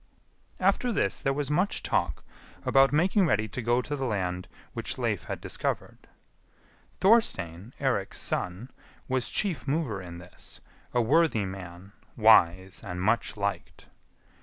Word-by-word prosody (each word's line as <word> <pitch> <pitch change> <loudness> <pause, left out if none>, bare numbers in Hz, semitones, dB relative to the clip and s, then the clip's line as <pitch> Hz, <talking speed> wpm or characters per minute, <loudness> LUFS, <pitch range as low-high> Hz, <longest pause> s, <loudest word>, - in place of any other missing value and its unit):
After 250 -2 +2
this 105 - 0
there 135 - +1
was 145 +1 -2
much 180 +7 +1
talk - - -1 0.4
about 135 0 +5
making 180 +5 +3
ready 110 -7 +1
to 125 - -4
go 120 +2 +1
to 145 - -3
the 135 -2 -3
land 90 -4 -2 0.3
which - - -4
Leif - - -1
had - - -4
discovered. - - -4 0.9
Thorstein, 110 - +2
Eirik's 125 -8 -1
son, 95 +8 -2 0.4
was 130 -2 0
chief 180 -9 0
mover 135 - -1
in 85 -1 -9
this, 90 +1 -10 0.3
a 120 - +2
worthy 120 -4 +3
man, 95 0 -8 0.3
wise 95 -4 +4
and 90 -3 -5
much 110 +4 +1
liked. 100 0 -3
115 Hz, 135 wpm, -28 LUFS, 95-145 Hz, 0.9 s, about